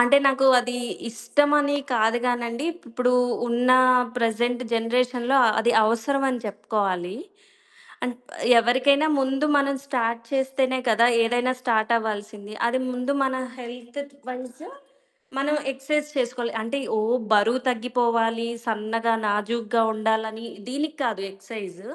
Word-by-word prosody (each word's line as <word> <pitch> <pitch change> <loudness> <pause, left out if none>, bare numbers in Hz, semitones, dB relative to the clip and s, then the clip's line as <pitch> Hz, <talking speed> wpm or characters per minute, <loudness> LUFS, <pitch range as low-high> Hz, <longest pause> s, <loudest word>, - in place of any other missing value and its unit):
అంటే, 245 +3 +6
నాకు 270 0 +3
అదీ 245 0 -4 0.3
ఇష్టమని 290 +5 +2 0.2
కాదు 225 +1 +2
గానండీ, 240 +3 -2 0.2
ఇప్పుడూ 250 +1 0 0.4
ఉన్నా 250 +2 +4 0.4
ప్రెజెంట్ 240 +1 0
జనరేషన్‌లో 245 +3 +1
అ - - +4
అది 235 +2 +2
అవసరవని 255 +3 0
చెప్పుకోవాలీ. 195 -3 -2 0.9
అన్ 250 - -2 0.5
ఎవరికైనా 260 +6 +3
ముందు 270 +2 0
మనం 280 0 +1
స్టార్ట్ 235 -4 -1
చేస్తేనే 265 -1 0
కదా! 230 +1 +5 0.2
ఏదైనా 245 +2 +1
స్టార్టవ్వాల్సింది. 220 -3 -1
అది 255 +2 0
ముందు 250 +2 -2
మన 265 -1 0 0.3
హెల్త్ 240 +2 -8
ట్ - - -25
వైజ్ 255 +2 -8 0.8
మనం 290 +2 +1 0.2
ఎక్సర్సైజ్ 295 +3 -2
చేసుకోవాలి. 245 -1 -2
అంటే, 230 +5 -3 0.2
ఓ - - +1 0.3
బరువు 220 +4 +3
తగ్గిపోవాలి, 230 -1 0 0.2
సన్నగా, 225 +1 0
నాజూగ్గా 225 +2 0
ఉండాలనీ, 220 +1 -1 0.2
దీనికి 295 +4 -3
కాదు 210 -5 -2
ఎక్సైజ్. 195 -2 -9
240 Hz, 115 wpm, -24 LUFS, 225-260 Hz, 0.9 s, అంటే